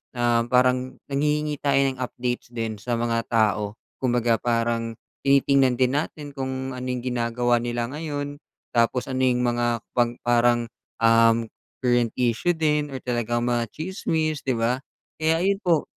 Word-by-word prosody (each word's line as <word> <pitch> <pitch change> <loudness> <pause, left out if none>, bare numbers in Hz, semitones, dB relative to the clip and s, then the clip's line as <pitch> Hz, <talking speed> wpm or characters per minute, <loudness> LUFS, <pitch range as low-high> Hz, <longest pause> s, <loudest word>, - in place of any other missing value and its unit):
um, 120 -1 +2
parang 125 +1 +2
nanghihingi 150 +1 0
tayo 140 -1 +2
ng 130 - -10
updates 125 -1 -3
din 115 -2 -3
sa 120 +4 -3
mga 115 0 0
tao 105 -2 +1 0.3
kumbaga 120 -3 +2
parang 115 -1 0 0.3
tinitingnan 135 -2 +4
din 130 0 +2
natin 150 -1 -4
kung 130 -1 -4
ano 125 0 -6
yung 125 -1 -2
ginagawa 120 -1 +1
nila 120 0 -2
ngayon, 145 -1 -4 0.3
tapos 120 +3 +1
ano 130 - -2
yung 125 -1 +2
mga 120 -1 0
pang 120 -1 +1
parang, 120 -1 +2 0.3
uhm, 115 0 +4 0.3
current 120 -2 +2
issue 125 +8 +2
din 150 -2 +1
or 135 - -5
talagang 120 -1 -1
mga 120 -1 +1
tsismis 160 -3 -2
'di 130 - 0
ba 120 +3 0 0.3
kaya 160 +1 +1
ayon 195 +1 +2
po. 170 -4 +3
125 Hz, 150 wpm, -24 LUFS, 120-140 Hz, 0.3 s, tinitingnan